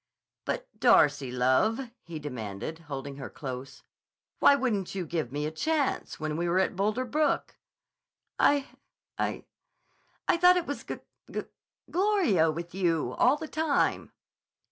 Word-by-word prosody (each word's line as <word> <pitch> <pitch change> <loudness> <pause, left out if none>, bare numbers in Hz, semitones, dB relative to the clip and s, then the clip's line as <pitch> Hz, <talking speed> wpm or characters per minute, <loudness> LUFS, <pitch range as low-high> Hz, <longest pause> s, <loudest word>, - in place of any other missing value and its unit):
"But, - - -2
Darcy, 145 -3 +4
love," 130 - +2 0.2
he 170 -2 -8
demanded, 125 0 -5
holding 140 0 -5
her 135 - -6
close, 130 -1 -7 0.6
"why 280 - +7
wouldn't 220 -9 -1
you 185 -2 -2
give 155 -6 -2
me 145 +2 -2
a 155 - -2
chance, 295 - -1
when 155 0 -2
we 170 +1 0
were 175 - +2
at 190 0 +2
Boulder 210 +6 0
Brook?" 300 +5 0 0.8
"I—I—I 285 +3 -3
thought 360 +1 +6
it 350 - 0
was 285 - -4
G - - -4
g - - -8
g - - -16 0.5
gloria 355 - +3
with 170 +2 -5
you, 165 -9 0
all 260 +4 +5
the 315 - -6
time." 310 -2 0
175 Hz, 140 wpm, -29 LUFS, -, 0.8 s, why